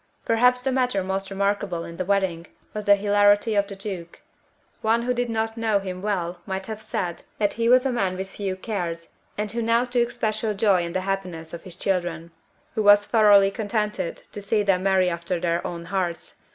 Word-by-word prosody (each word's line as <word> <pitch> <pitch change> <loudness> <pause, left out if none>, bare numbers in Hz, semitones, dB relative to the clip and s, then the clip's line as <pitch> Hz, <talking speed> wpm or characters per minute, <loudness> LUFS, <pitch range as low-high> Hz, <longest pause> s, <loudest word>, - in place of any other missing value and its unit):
Perhaps 250 +2 +3
the 265 - +1
matter 250 -7 +1
most 190 +1 -3
remarkable 200 -3 -1
in 170 - -9
the 185 - -2
wedding 190 -4 0 0.3
was 210 -1 -5
the 205 - +7
hilarity 205 +2 +3
of 200 -1 +2
the 200 - -6
Duke. 190 -4 -7 0.6
One 225 +2 +2
who 250 +1 0
did 245 -1 -1
not 225 0 -2
know 220 -2 +2
him 185 -2 -5
well 180 -4 -2
might 190 0 -3
have 220 0 -6
said 180 -5 -3 0.2
that 205 -2 +1
he 230 0 0
was 250 +1 +5
a 265 - +1
man 195 -6 -1
with 190 +1 -4
few 195 -1 -4
cares, 175 -5 -4 0.3
and 210 0 -2
who 235 +1 -2
now 230 +2 +2
took 240 -1 +1
special 215 -1 -1
joy 195 -3 +3
in 170 0 -4
the 185 - 0
happiness 185 -4 -4
of 170 +3 -8
his 180 -3 -10
children, 175 -3 -2 0.4
who 220 - 0
was 205 0 +7
thoroughly 205 -3 +5
contented 210 -3 -2
to 205 - -7
see 205 +1 +1
them 195 -2 +2
marry 190 -1 +3
after 170 +1 -2
their 170 0 0
own 170 -1 -6
hearts. 180 -2 -3
200 Hz, 205 wpm, -24 LUFS, 185-220 Hz, 0.6 s, the